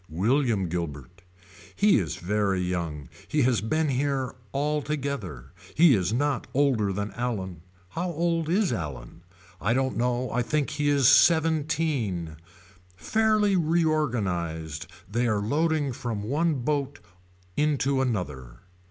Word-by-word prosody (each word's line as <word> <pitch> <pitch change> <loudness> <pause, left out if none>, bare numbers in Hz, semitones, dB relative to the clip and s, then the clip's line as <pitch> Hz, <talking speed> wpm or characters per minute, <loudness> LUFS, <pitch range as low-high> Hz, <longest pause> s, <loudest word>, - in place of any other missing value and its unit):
William 110 - +1
Guilbert. 85 -1 -5 0.5
He 205 - +4
is 85 -7 -3
very 100 +1 0
young. 85 -6 -3 0.2
He 150 -2 +1
has 125 -2 +2
been 155 +8 0
here 135 -1 -1 0.2
altogether. 140 - -3 0.2
He 165 -2 +6
is 95 -3 +1
not 140 +3 0
older 130 -8 +2
than 105 +2 -3
Allan. 95 -7 -4 0.3
How 180 - -3
old 165 -1 0
is 190 +2 +2
Allan. 75 +1 -6 0.4
I 115 +5 +1
do 135 - +2
not 130 - -3
know 125 +1 0
I 125 - +1
think 150 +4 -1
he 145 -1 0
is 140 -3 +4
seventeen. 150 - +2 0.6
Fairly 215 - +2
reorganized 105 - 0 0.2
they 120 +5 0
are 105 -2 +1
loading 145 +5 0
from 115 -5 -4
one 155 +8 +1
boat 140 +1 -2 0.6
into 140 -2 +1
another. 75 - -3
125 Hz, 125 wpm, -26 LUFS, 95-150 Hz, 0.6 s, He